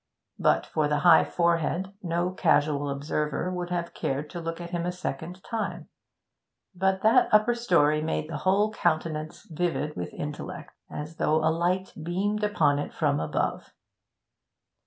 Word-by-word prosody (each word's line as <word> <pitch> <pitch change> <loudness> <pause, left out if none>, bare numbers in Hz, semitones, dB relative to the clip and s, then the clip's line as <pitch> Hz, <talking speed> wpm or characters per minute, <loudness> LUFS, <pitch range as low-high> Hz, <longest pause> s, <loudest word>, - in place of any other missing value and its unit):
But - - +3
for 155 -2 0
the 145 0 0
high 165 -2 +8
forehead, 170 +2 0
no 175 0 -1
casual 150 -5 +2
observer 150 +5 -2
would 180 -1 -4
have 175 -1 -3
cared 140 +2 -3
to 175 - -5
look 165 0 -4
at 175 0 -7
him 175 -1 -2
a - - 0
second 180 +1 -6
time; 225 -2 -4 0.8
but 190 +1 0
that 220 +1 +5
upper 215 +3 +5
story 170 -10 +3
made 155 -1 -2
the 165 - -4
whole 205 +3 +2
countenance 155 -5 -1
vivid 160 -2 -2
with 90 - -5
intellect, 155 +3 -6 0.2
as 155 +2 -7
though 155 - +2
a 160 - +3
light 180 +3 0
beamed 200 +6 -1
upon 155 -9 +2
it 145 - -5
from 145 -3 +1
above. 80 - -2
170 Hz, 155 wpm, -27 LUFS, 150-185 Hz, 0.8 s, high